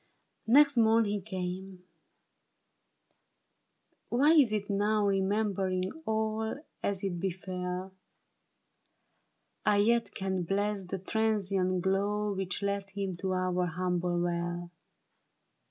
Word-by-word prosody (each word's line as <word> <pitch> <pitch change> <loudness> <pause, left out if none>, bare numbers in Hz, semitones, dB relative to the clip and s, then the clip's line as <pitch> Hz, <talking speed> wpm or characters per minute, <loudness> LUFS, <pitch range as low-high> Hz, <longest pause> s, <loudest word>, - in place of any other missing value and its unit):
Next 280 +1 +6
morn 225 0 +5
he 205 -1 -1
came. 185 -1 -5 2.3
Why 275 +6 +4
is 290 -9 +6
it 210 -2 -1
now. 205 +1 +1
Remembering 195 -1 0 0.2
all 220 +1 -1 0.2
as 200 -1 -2
it 180 -3 -2
befell, 185 0 -4 1.7
I 210 -1 +3
yet 230 +3 +2
can 190 -1 -1
bless 200 +2 -1
the 190 +2 -4
transient 195 -3 0
glow 205 +2 0
Which 190 0 -3
led 200 -1 -1
him 195 -1 -3
to 190 +1 -2
our 180 -1 0
humble 175 0 -1
well 175 0 -2
195 Hz, 105 wpm, -30 LUFS, 185-210 Hz, 2.3 s, Next